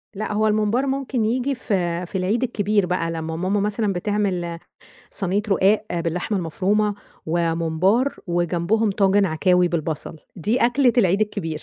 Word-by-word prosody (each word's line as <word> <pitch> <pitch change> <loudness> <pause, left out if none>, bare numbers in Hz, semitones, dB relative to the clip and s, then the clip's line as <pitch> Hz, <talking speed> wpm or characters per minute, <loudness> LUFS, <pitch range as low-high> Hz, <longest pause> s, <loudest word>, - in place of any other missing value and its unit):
لأ، 210 +1 -3
هو 215 +1 +2
الممبار 215 +5 +1
ممكن 265 -4 -1
ييجي 255 +4 0
في 180 -6 -1
في 190 - -4
العيد 205 +7 0
الكبير 205 -4 +1
بقى، 175 -2 -1
لمّا 160 0 -4
ماما 185 +4 0
مثلًا 210 0 0
بتعمل 180 -3 -2 0.5
صينية 195 +1 -1
رقاق 200 +2 +3 0.2
باللحمة 180 +5 -2
المفرومة 200 +5 0 0.3
وممبار، 170 - +1
وجنبهم 175 +5 +1
طاجن 195 0 +3
عكاوي 180 +2 +2
بالبصل، 160 -1 -3 0.2
دي 215 +8 0
أكلة 245 0 +3
العيد 195 -1 +3
الكبير. 165 -7 -2
195 Hz, 140 wpm, -22 LUFS, 170-215 Hz, 0.5 s, رقاق